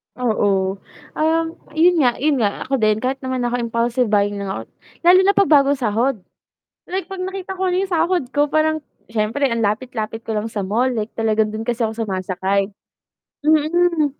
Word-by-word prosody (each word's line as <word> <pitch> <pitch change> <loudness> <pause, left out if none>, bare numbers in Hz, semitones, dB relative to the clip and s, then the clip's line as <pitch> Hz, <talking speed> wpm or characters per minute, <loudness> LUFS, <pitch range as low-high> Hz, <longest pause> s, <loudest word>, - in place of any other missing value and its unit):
Oo, 200 -5 0 0.4
um, 325 +1 +2 0.3
'yun 340 +2 +4
nga 245 -5 +3
'yun 290 0 +1
nga 205 -3 0
ako 270 -1 -1
din 215 0 +2
kahit 265 +2 -1
naman 260 -1 -3
ako 245 0 0
impulsive 235 +1 0
buying 205 -1 +1
lang 200 - -4
ako 190 -12 -4 0.4
lalo 355 +2 +7
na 400 - +5
'pag 395 - +3
bagong 285 -1 +5
sahod. 245 +1 0 0.7
Like 375 +1 -2
'pag 385 -1 -7
nakita 380 0 -5
ko 375 0 -1
na 360 - 0
'yong 380 -1 -1
sahod 345 0 +2
ko 290 0 +2
parang, 310 +1 +1 0.2
siyempre 225 +5 -1
ang 230 - -1
lapit-lapit 225 +1 -2
ko 225 - -3
lang 215 +1 -2
sa 205 -3 -3
mall 230 +7 +1
like 215 +1 -3
talagang 220 -1 0
dun 215 - -4
kasi 235 0 -1
ako 220 - -3
sumasakay, 195 -1 -1 0.7
mm, 315 -1 +2
245 Hz, 180 wpm, -20 LUFS, 215-310 Hz, 0.7 s, lalo